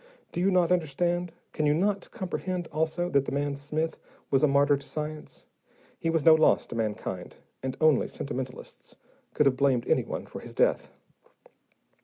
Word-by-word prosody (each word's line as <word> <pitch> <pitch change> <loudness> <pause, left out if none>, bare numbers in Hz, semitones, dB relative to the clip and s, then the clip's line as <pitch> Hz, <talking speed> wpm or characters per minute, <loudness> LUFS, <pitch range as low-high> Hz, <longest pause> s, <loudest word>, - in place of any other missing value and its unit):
Do 175 - -2
you 190 - +3
not 180 -2 +3
understand, 175 +1 0 0.2
can 155 - 0
you 145 - +3
not 200 +4 0
comprehend, 185 -4 -4
also, 160 +3 0
that 140 -1 +3
the - - -4
man 140 0 -1
Smith 155 +3 -3 0.3
was 135 - +4
a 150 - +5
martyr 140 +1 +4
to 140 - -6
science? 155 0 -6 0.5
He 165 - -1
was 165 -3 0
no 160 - +9
loss 160 0 +4
to - - -8
mankind, 105 -5 -3 0.3
and 130 -1 -4
only 155 -4 +4
sentimentalists 130 -2 -7 0.4
could 150 - +3
have 130 -2 +3
blamed 130 -4 +2
anyone - - 0
for - - -9
his - - -11
death. - - +2
155 Hz, 170 wpm, -28 LUFS, 140-175 Hz, 0.5 s, no